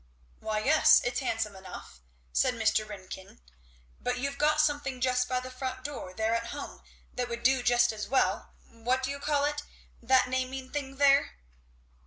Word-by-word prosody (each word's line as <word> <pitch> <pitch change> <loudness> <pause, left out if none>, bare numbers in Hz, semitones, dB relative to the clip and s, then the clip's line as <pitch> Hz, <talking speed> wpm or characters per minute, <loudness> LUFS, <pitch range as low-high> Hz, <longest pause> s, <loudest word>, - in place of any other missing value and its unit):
"Why 215 -1 -2
yes, 310 +4 +6
it's 245 0 -1
handsome 220 -5 -2
enough," 190 - -10 0.3
said - - +2
Mr. 220 -1 +1
Ringgan, 190 - -9 0.6
"but 250 0 -2
you've 280 +2 -3
got 300 +1 +3
something 290 -4 +1
just 250 0 +1
by 255 -1 +1
the 255 0 -8
front 255 0 -5
door 255 -10 -6
there 220 +4 0
at 230 0 -1
home 285 +3 -7 0.3
that 245 -1 -3
would 235 0 -5
do 260 +1 +4
just 240 -1 +4
as 210 -1 -5
well 265 - +1 0.2
what 245 +3 -1
do 260 - -1
you 280 - -5
call 290 0 +1
it? 295 0 -1 0.4
that 260 -1 +4
naming 260 0 -3
thing 275 -2 -4
there?" 275 - +4
255 Hz, 175 wpm, -29 LUFS, 230-275 Hz, 0.6 s, yes